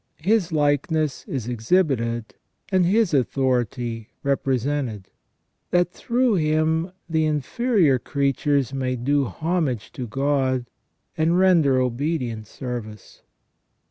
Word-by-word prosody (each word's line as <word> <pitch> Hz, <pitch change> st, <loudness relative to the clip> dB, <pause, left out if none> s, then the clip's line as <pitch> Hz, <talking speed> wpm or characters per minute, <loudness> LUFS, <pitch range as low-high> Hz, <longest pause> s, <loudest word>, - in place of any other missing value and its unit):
His 195 Hz, -2 st, +2 dB
likeness 150 Hz, 0 st, 0 dB
is 125 Hz, -5 st, -4 dB
exhibited, 120 Hz, -2 st, 0 dB, 0.4 s
and 185 Hz, -2 st, +3 dB
His 210 Hz, -2 st, +2 dB
authority 125 Hz, -3 st, 0 dB
represented, 135 Hz, -6 st, -1 dB, 0.6 s
that 175 Hz, 0 st, +2 dB
through 245 Hz, +2 st, +1 dB
him 160 Hz, +2 st, +1 dB, 0.2 s
the 160 Hz, -2 st, +1 dB
inferior 155 Hz, -, +2 dB
creatures 140 Hz, 0 st, 0 dB
may 130 Hz, -1 st, -1 dB
do 140 Hz, +3 st, +1 dB
homage 145 Hz, -, -2 dB
to 130 Hz, -7 st, -6 dB
God, 135 Hz, 0 st, 0 dB, 0.5 s
and 165 Hz, +2 st, +2 dB
render 165 Hz, -8 st, +4 dB
obedient 125 Hz, -3 st, -2 dB
service. 115 Hz, -6 st, -7 dB
140 Hz, 100 wpm, -23 LUFS, 125-160 Hz, 0.6 s, render